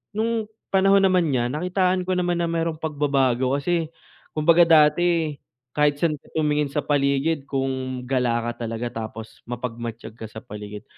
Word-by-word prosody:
nung 225 0 -1 0.3
panahon 195 +1 +5
naman 185 -4 +3
niya, 125 -3 +1
nakitaan 180 +3 +1
ko 185 - +1
naman 175 -1 0
na 170 - 0
merong 165 -1 -1
pagbabago 135 -4 +1
kasi 165 +2 -1 0.4
kumbaga 165 +3 +5
dati 165 0 +4 0.4
kahit 150 -1 +2
saan 155 -3 +1
ka - - -24
tumingin 150 -2 +1
sa 140 +1 -2
paligid 140 +1 0
kung 130 -2 -2
gala 125 -2 0
ka 120 0 -6
talaga 115 +1 -4
tapos 110 0 -9
mapagmatyag 115 -2 -6
ka 110 - -6
sa 110 +1 -10
paligid, 105 0 -8
145 Hz, 155 wpm, -23 LUFS, 125-170 Hz, 0.4 s, panahon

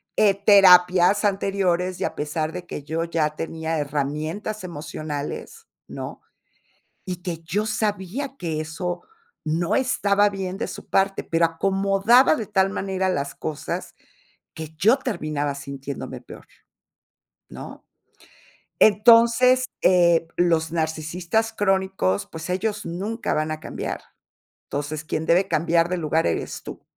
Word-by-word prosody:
eh, 205 -2 +4
terapias 190 -1 +6
anteriores 190 -2 0
y - - -1
a - - -4
pesar 155 +2 -3
de 180 -1 -6
que 150 -4 -7
yo 160 +2 -2
ya 160 -3 -1
tenía 160 0 -3
herramientas 150 +9 -3
emocionales, 155 - -6 0.2
¿no?, - - -7 0.9
y 180 -1 -5
que 170 -3 -4
yo 200 +6 -1
sabía 215 +5 -2
que 160 -3 -3
eso 175 +3 -4 0.4
no 170 +6 0
estaba 205 -6 +2
bien 190 -2 -4
de - - -2
su - - -9
parte, 195 0 +1
pero 165 0 +1
acomodaba 195 - +3
de 220 -8 -4
tal 195 -2 +2
manera 190 -1 -2
las 140 -6 -2
cosas 155 -2 -5 0.6
que 160 -1 -6
yo 225 - +4
terminaba 155 - -2
sintiéndome 140 0 -7
peor, - - -13 1.0
¿no? - - -10 0.9
Entonces, 235 +4 +6 0.2
eh, 170 -2 +4
los 165 -2 +2
narcisistas 170 +7 -1
crónicos, 190 - 0
pues 160 +1 -8
ellos 205 +3 -2
nunca 200 +7 -3
van 155 +1 -1
a 155 - -4
cambiar. - - -5 0.6
Entonces, 145 +2 -4
quien 155 +1 -3
debe 180 +4 +3
cambiar 170 0 +2
de 180 - -1
lugar 160 0 +1
eres 85 - -3
tú. - - -9
180 Hz, 130 wpm, -23 LUFS, 160-200 Hz, 1.0 s, terapias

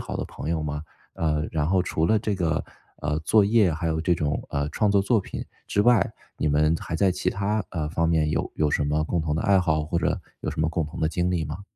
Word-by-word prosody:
好 - - -5
的 - - -3
朋 - - -7
友 80 -1 0
吗？ 75 -1 -3 0.3
呃， 75 -1 0
然 75 -2 0
后 95 0 +3
除 80 -2 0
了 110 - +3
这 105 -1 -1
个， 85 -4 0 0.4
呃， 75 +1 0
作 105 +7 +4
业 105 -2 +4
还 85 +2 -3
有 80 0 0
这 85 +2 +2
种， 75 -3 -1
呃， 70 0 -1
创 105 +6 +1
作 100 -1 +3
作 110 +2 +2
品 - - -6 0.2
之 100 - +1
外， 115 -4 +4 0.3
你 - - +1
们 75 +2 +3
还 85 - -4
在 95 +1 +3
其 90 - -1
他， 105 +2 0
呃， 75 -4 -3
方 85 0 +1
面 80 -2 +2
有 - - -1
有 75 -1 +2
什 75 - +1
么 75 +1 +1
共 85 +2 -1
同 75 -1 -1
的 - - -1
爱 100 -1 +4
好？ 75 -3 +1
或 85 +3 -1
者 85 - 0 0.2
有 - - -3
什 - - -8
么 80 - +2
共 85 -2 -1
同 75 - -9
的 80 - +1
经 90 +1 0
历 85 -3 0
吗？ 75 +6 -6
80 Hz, 280 characters per minute, -25 LUFS, 75-95 Hz, 0.4 s, 作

